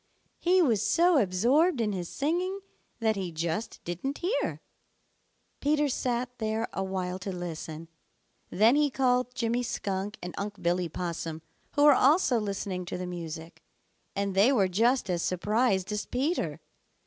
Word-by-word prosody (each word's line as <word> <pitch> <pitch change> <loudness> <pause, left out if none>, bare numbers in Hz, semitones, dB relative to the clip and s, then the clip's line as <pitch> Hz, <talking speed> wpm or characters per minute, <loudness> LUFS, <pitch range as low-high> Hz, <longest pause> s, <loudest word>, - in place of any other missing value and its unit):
He 360 +1 +4
was 225 - +2
so 345 -2 +4
absorbed 245 - +3
in 215 -2 +1
his 180 -3 -4
singing 360 +7 -1 0.4
that 220 -1 +2
he 190 -3 -3
just 165 +6 -3
didn't 180 - -3
hear. 385 +8 -1 1.0
Peter 295 0 +2
sat 245 -1 -2
there 220 0 -1
a 195 - -1
while 185 -1 -3
to 195 +1 -4
listen; 165 -2 -6 0.6
then 220 +7 +4
he 295 0 +3
called 250 -1 +1
Jimmy 235 0 0
Skunk 200 -3 -3
and 180 0 -6
Unc' 205 0 -5
Billy 175 0 0
Possum, 165 -1 -4 0.3
who 290 - +4
were 295 -1 +9
also 270 -2 +4
listening 195 -3 -3
to 175 - -4
the 180 - -4
music, 165 -2 -7 0.5
and 200 -1 -1
they 200 +7 +5
were 205 -8 +3
just 230 +6 +2
as 175 -2 0
surprised 200 +2 +1
as 210 0 -3
Peter. 285 +8 -1
210 Hz, 150 wpm, -28 LUFS, 180-260 Hz, 1.0 s, were